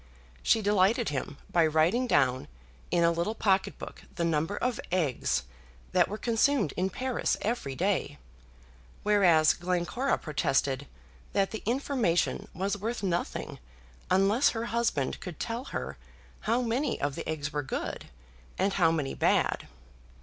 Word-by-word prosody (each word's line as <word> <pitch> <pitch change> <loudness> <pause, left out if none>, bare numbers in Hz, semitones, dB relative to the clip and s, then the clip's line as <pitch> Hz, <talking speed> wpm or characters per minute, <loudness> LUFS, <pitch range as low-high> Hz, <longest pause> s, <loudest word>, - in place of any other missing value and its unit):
She 225 - +3
delighted 205 +3 +3
him 140 0 -4
by 170 - +4
writing 165 +11 +2
down 130 - +2 0.4
in 170 - +2
a 170 - +5
little 170 +6 -1
pocket 195 -3 +1
book - - -9
the 170 - 0
number 165 +4 0
of 250 -2 -1
eggs 145 - 0 0.5
that - - +4
were 210 - -4
consumed 230 - +2
in 185 +1 0
Paris 255 +6 -1
every 210 - -2
day, 185 - 0 0.9
whereas 180 -7 +5
Glencora 180 +9 0
protested 140 -2 0 0.5
that 195 -1 +1
the 220 - -5
information 240 - +1
was 195 +3 -2
worth 225 +2 -3
nothing 175 -2 -2 0.5
unless 200 +8 +4
her 225 0 -3
husband 230 - 0
could 180 -4 -8
tell 235 +3 -3
her - - -5 0.5
how 240 +2 +3
many 245 +4 0
of 145 -1 -1
the - - -5
eggs 150 -2 -3
were 150 - 0
good, 135 - -5 0.5
and 195 +1 +1
how 170 -4 +4
many 150 -5 -1
bad. - - +1
190 Hz, 140 wpm, -29 LUFS, 155-230 Hz, 0.9 s, a